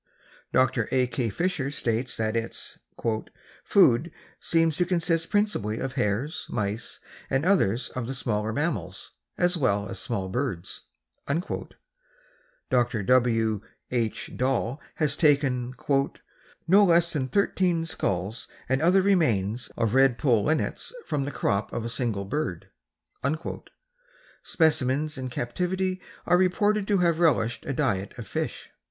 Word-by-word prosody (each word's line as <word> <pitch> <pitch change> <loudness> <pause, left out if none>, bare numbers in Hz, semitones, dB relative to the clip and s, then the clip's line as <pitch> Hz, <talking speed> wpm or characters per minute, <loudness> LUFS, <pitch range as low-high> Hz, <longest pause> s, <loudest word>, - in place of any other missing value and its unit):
Dr. 130 -3 +2
A. 130 -1 +3
K. 125 -1 -2
Fisher 160 - -1
states 120 -2 -2
that 110 0 -1
its 115 0 -3 0.8
"food 160 -4 +4 0.3
seems 165 -2 +2
to 180 - +3
consist 165 -2 +1
principally 205 - 0
of 135 +1 -3
hares, 110 +10 -1
mice 110 0 -3 0.3
and 135 +4 +1
others 135 - +2
of 125 -2 -4
the 135 - -4
smaller 110 -4 -1
mammals 105 - -3 0.3
as 175 0 +2
well 100 -8 +1
as 95 - -6
small 105 -7 -2
birds." 100 -4 -4 1.9
Dr. 120 -3 +2
W. 115 -2 +2 0.3
H. 115 -3 -2
Dall 130 +1 0
has 150 -2 +1
taken 135 -5 +2 0.9
"no 195 +4 +7
less 170 -2 +4
than 135 -4 -1
thirteen 180 -1 +1
skulls 100 - -2 0.2
and 130 +2 +1
other 185 +4 +4
remains 120 - +1
of 115 -1 +1
red 135 -2 +4
poll 120 -8 +2
linnets 155 0 -1
from 140 -2 -1
the 145 - -3
crop 100 -4 -1
of 115 - -3
a - - -2
single 115 -5 -2
bird." 100 - -3 1.7
Specimens 150 -2 +1
in 130 0 -4
captivity 185 +10 -2 0.2
are 175 - +4
reported 205 +3 +2
to 205 - +3
have 170 -2 +2
relished 135 -8 +2
a 135 - -1
diet 100 -9 -1
of - - -6
fish. - - -4
130 Hz, 130 wpm, -26 LUFS, 115-165 Hz, 1.9 s, no